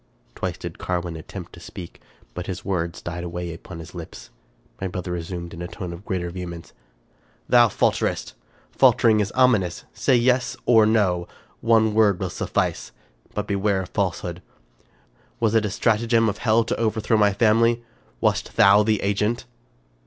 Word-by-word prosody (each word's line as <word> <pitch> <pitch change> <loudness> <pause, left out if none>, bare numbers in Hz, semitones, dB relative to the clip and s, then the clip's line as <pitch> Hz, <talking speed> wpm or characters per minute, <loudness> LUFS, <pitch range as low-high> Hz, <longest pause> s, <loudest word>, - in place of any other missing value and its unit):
Twice - - -4
did - - -8
Carwin 85 -2 -2
attempt 80 - -9
to - - -11
speak, 85 -2 -10 0.3
but 90 0 -6
his 90 -1 -5
words 85 -3 -2
died 85 +1 -5
away 85 0 -5
upon 85 +1 -10
his 80 +1 -10
lips. 85 -2 -9 0.5
My 95 - -1
brother 90 0 -5
resumed, 85 0 -5
in 85 - -8
a 85 - -4
tone 90 -1 -6
of 85 +4 -11
greater 90 -2 -2
vehemence: 85 -2 -7 0.3
— - - -38
" - - -37
Thou 120 -1 +6
falterest. - - 0 0.4
Faltering 110 -2 +4
is 100 -1 0
ominous. 115 -9 +2
Say 130 - +2
yes 125 +2 +2
or 110 -3 +6
no; 95 -6 +2 0.3
one 110 -2 +3
word 105 -4 +3
will 95 -3 -3
suffice; - - -2 0.4
but 105 - -2
beware 100 -1 0
of 90 - -11
falsehood. - - -2 1.0
Was 115 -2 +2
it 110 -1 +3
a - - -1
stratagem 115 +2 +2
of 100 - -5
hell 115 0 +3
to - - -2
overthrow 110 -1 +1
my 105 -1 +4
family? 115 +3 +3 0.4
Wast - - 0
thou 100 +1 +6
the 105 -1 +2
agent?" 105 +4 0
100 Hz, 165 wpm, -23 LUFS, 90-110 Hz, 1.0 s, Thou